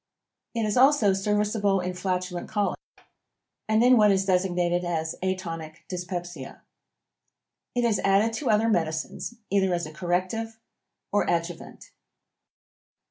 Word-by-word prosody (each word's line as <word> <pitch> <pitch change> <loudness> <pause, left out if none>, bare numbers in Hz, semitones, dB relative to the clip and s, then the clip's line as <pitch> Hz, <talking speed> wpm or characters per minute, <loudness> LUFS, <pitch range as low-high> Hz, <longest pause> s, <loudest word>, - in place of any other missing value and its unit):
It 230 - 0
is 210 +1 0
also 255 -6 +5
serviceable 205 0 +1
in 180 0 -3
flatulent 180 -1 -3
colic, 205 -1 -1 0.9
and 220 +1 +4
in 250 0 +6
what 210 -1 +6
is 195 -1 +2
designated 180 -2 +1
as 160 -2 -2
atonic 165 -4 -4
dyspepsia. 175 -5 -6 1.1
It 245 - +1
is 220 -4 +2
added 200 +3 +3
to 270 - -2
other 220 +1 +3
medicines, 165 +2 -1 0.2
either 195 -2 +2
as 170 - -3
a 155 - -9
corrective, 185 +7 -2 0.5
or 205 - +1
adjuvant. 170 0 -4
190 Hz, 125 wpm, -26 LUFS, 175-210 Hz, 1.1 s, in